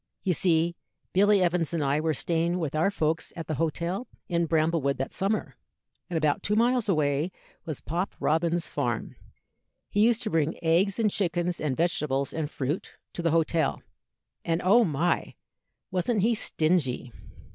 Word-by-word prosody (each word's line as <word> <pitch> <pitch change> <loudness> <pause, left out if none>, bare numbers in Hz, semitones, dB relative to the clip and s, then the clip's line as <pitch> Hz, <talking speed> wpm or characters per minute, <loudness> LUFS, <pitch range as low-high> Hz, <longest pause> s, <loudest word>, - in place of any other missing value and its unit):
"You 185 - +2
see, 170 0 +2 0.4
Billy 200 0 +5
Evans 170 -2 0
and 160 - 0
I 140 +2 +1
were 155 0 0
staying 170 +4 0
with 160 -6 -2
our 155 +5 +2
folks 160 -4 -1
at 165 - -5
the 155 - -3
hotel 170 - -2 0.2
in 170 -1 0
Bramblewood 155 -3 +1
that 135 - -3
summer, 200 +3 -1 0.5
and 175 - -1
about 155 -2 +1
two 210 - 0
miles 235 0 +2
away 150 0 +1 0.3
was 155 -5 -4
Pop 175 +5 -3
Robins's 165 +2 +1
farm. - - -2 0.8
He - - 0
used 235 +2 +3
to 215 - -3
bring 160 -1 +1
eggs 175 +4 +2
and 220 -3 +2
chickens 175 -3 -1
and 140 -4 -1
vegetables 150 -5 0
and 155 -2 -2
fruit 145 +3 -3 0.2
to - - -4
the 170 - +2
hotel; 165 -1 +1 0.6
and, 165 0 0
oh 230 +6 +6
my! 170 -1 0 0.6
wasn't 190 +3 0
he 235 +2 +4
stingy? 155 - 0
170 Hz, 160 wpm, -27 LUFS, 155-185 Hz, 0.8 s, oh